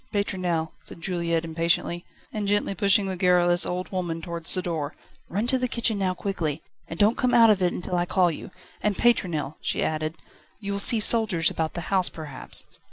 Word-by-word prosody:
Pétronelle!" 180 Hz, -6 st, -1 dB
said -, -, -9 dB
Juliette 170 Hz, -2 st, -1 dB
impatiently, 170 Hz, +1 st, 0 dB, 0.3 s
and 210 Hz, -2 st, -3 dB
gently 205 Hz, 0 st, +1 dB
pushing 200 Hz, +1 st, +3 dB
the 190 Hz, -1 st, -3 dB
garrulous 175 Hz, -1 st, +3 dB
old 180 Hz, +1 st, -4 dB
woman 175 Hz, -3 st, -3 dB
towards 170 Hz, 0 st, -3 dB
the 185 Hz, -, +1 dB
door. 160 Hz, -4 st, -3 dB, 0.3 s
"Run 205 Hz, +5 st, -1 dB
to 260 Hz, +1 st, +2 dB
the 250 Hz, -, 0 dB
kitchen 230 Hz, -3 st, +1 dB
now 185 Hz, -1 st, 0 dB
quickly, 165 Hz, -7 st, -3 dB, 0.2 s
and 165 Hz, -, -7 dB
don't 210 Hz, +4 st, +3 dB
come 250 Hz, -1 st, +2 dB
out 230 Hz, -2 st, +7 dB
of 200 Hz, -3 st, +1 dB
it 180 Hz, -1 st, +2 dB
until 180 Hz, 0 st, -3 dB
I 175 Hz, 0 st, 0 dB
call 180 Hz, -2 st, +2 dB
you. 155 Hz, -, -8 dB, 0.3 s
And, 210 Hz, -1 st, 0 dB
Pétronelle," 170 Hz, -12 st, +1 dB
she -, -, 0 dB
added, 155 Hz, +1 st, -2 dB, 0.4 s
"you 200 Hz, -2 st, -5 dB
will 200 Hz, -, -2 dB
see 225 Hz, +3 st, +5 dB
soldiers 215 Hz, -7 st, +4 dB
about 160 Hz, -1 st, -3 dB
the 175 Hz, -, -3 dB
house 185 Hz, -2 st, +3 dB
perhaps." 155 Hz, -4 st, -4 dB
180 Hz, 195 wpm, -25 LUFS, 165-200 Hz, 0.4 s, out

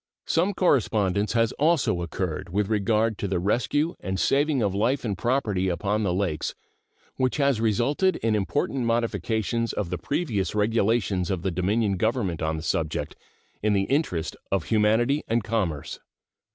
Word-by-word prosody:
Some 180 Hz, +4 st, +1 dB
correspondence 105 Hz, -, +2 dB
has 115 Hz, -1 st, +2 dB
also 150 Hz, -, +2 dB
occurred 85 Hz, -1 st, -3 dB
with 100 Hz, +3 st, 0 dB
regard 110 Hz, +1 st, +1 dB
to 100 Hz, -, -2 dB
the 95 Hz, -1 st, 0 dB
rescue 125 Hz, -, 0 dB
and 95 Hz, 0 st, -3 dB
saving 140 Hz, -2 st, +2 dB
of 100 Hz, -2 st, 0 dB
life 120 Hz, +7 st, 0 dB
and 105 Hz, -3 st, -1 dB
property 105 Hz, -4 st, 0 dB
upon 100 Hz, +4 st, -1 dB
the 100 Hz, -4 st, 0 dB
Lakes, 90 Hz, -4 st, -1 dB, 0.6 s
which 130 Hz, +1 st, 0 dB
has 140 Hz, -6 st, +2 dB
resulted 125 Hz, -, +2 dB
in 115 Hz, -1 st, 0 dB
important 120 Hz, +5 st, -1 dB
modifications 115 Hz, 0 st, 0 dB
of 95 Hz, -5 st, -3 dB
the 90 Hz, -, -2 dB
previous 115 Hz, -, -1 dB
regulations 105 Hz, -3 st, +1 dB
of 95 Hz, -3 st, -2 dB
the 95 Hz, -, 0 dB
Dominion 100 Hz, +3 st, 0 dB
government 105 Hz, -6 st, 0 dB
on 80 Hz, 0 st, -1 dB
the 80 Hz, -, -6 dB
subject 80 Hz, -2 st, -2 dB, 0.5 s
in 105 Hz, 0 st, +2 dB
the 100 Hz, -1 st, +2 dB
interest 115 Hz, -, -1 dB, 0.2 s
of 95 Hz, -4 st, +1 dB
humanity 115 Hz, -, +2 dB
and 115 Hz, 0 st, +1 dB
commerce. 95 Hz, -10 st, -2 dB
105 Hz, 155 wpm, -25 LUFS, 95-120 Hz, 0.6 s, correspondence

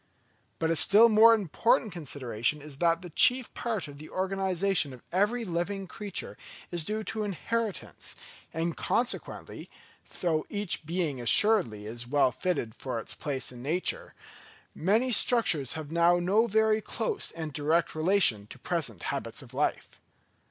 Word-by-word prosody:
But 165 Hz, 0 st, 0 dB
a -, -, +2 dB
still 210 Hz, +8 st, +6 dB
more 225 Hz, +1 st, +7 dB
important 225 Hz, -, +1 dB
consideration 140 Hz, -5 st, -2 dB
is 145 Hz, -1 st, -10 dB
that 170 Hz, +2 st, +1 dB
the 175 Hz, -, -9 dB
chief 250 Hz, +8 st, +2 dB
part 220 Hz, -9 st, -3 dB
of 140 Hz, -1 st, -11 dB
the 155 Hz, -, -10 dB
organisation 190 Hz, -4 st, 0 dB
of 125 Hz, -, -13 dB
every 210 Hz, +6 st, +1 dB
living 190 Hz, +2 st, -3 dB
creature 200 Hz, +2 st, -6 dB, 0.3 s
is 175 Hz, -2 st, +1 dB
due 215 Hz, +6 st, -3 dB
to 220 Hz, +1 st, -4 dB
inheritance; 210 Hz, +2 st, -3 dB, 0.4 s
and 165 Hz, +1 st, -2 dB
consequently, 240 Hz, +1 st, -3 dB, 0.5 s
though 160 Hz, -3 st, 0 dB
each 205 Hz, -6 st, -2 dB
being 165 Hz, -7 st, -2 dB
assuredly 120 Hz, -, +2 dB
is 120 Hz, +3 st, -5 dB
well 135 Hz, -1 st, +3 dB
fitted 130 Hz, -4 st, -2 dB
for 130 Hz, 0 st, -5 dB
its -, -, -7 dB
place 135 Hz, -4 st, -3 dB
in 120 Hz, -1 st, -11 dB
nature, 160 Hz, +8 st, -1 dB, 0.6 s
many 220 Hz, +10 st, +1 dB
structures 200 Hz, -, +4 dB
have 155 Hz, -1 st, -7 dB
now 170 Hz, +1 st, +4 dB
no 200 Hz, +6 st, +2 dB
very 220 Hz, 0 st, +2 dB
close 435 Hz, -, -2 dB
and 160 Hz, -3 st, -6 dB
direct 155 Hz, +4 st, +1 dB
relation 155 Hz, -, +2 dB
to 130 Hz, -, -11 dB
present 135 Hz, -, -3 dB
habits -, -, -4 dB
of -, -, -15 dB
life. -, -, -2 dB
175 Hz, 150 wpm, -28 LUFS, 145-210 Hz, 0.6 s, more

